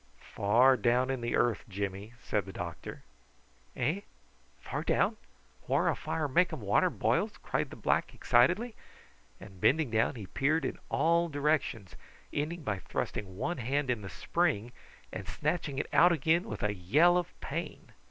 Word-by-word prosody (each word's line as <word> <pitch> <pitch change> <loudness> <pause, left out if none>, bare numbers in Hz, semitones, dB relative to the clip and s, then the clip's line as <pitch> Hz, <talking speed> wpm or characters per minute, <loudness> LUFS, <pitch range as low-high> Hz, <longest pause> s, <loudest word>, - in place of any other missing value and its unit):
"Far 120 +6 +4
down 125 +4 +2
in 130 -2 -3
the 120 0 -1
earth, 120 -2 +1
Jimmy," 100 +2 -4
said 105 - -1
the 95 - -8
doctor. 85 -3 -7 0.7
"Eh? 155 +11 0 0.6
Far - - -4
down? - - +1 0.5
Whar - - +2
a - - +1
fire 155 -2 -2
makum 165 +2 +2
water 100 0 +3
boils?" - - 0
cried - - -1
the - - -9
black - - 0
excitedly; 180 - +3 0.7
and 95 -2 -13
bending 150 -3 +3
down 115 +4 +1
he 110 -4 -7
peered 145 - 0
in - - -4
all 170 +1 +2
directions, 145 - -1 0.4
ending 155 +3 -2
by 105 -7 -2
thrusting 95 +1 -4
one 175 - -2
hand 135 +2 0
in 120 -4 -2
the 95 - -7
spring 135 - -1 0.4
and - - -6
snatching 155 -6 -2
it - - -1
out 175 +1 +6
again 165 +2 +2
with 105 -2 -6
a 105 -1 +1
yell 145 - +4
of 180 -1 -2
pain. 160 +1 -6
130 Hz, 160 wpm, -31 LUFS, 105-160 Hz, 0.7 s, out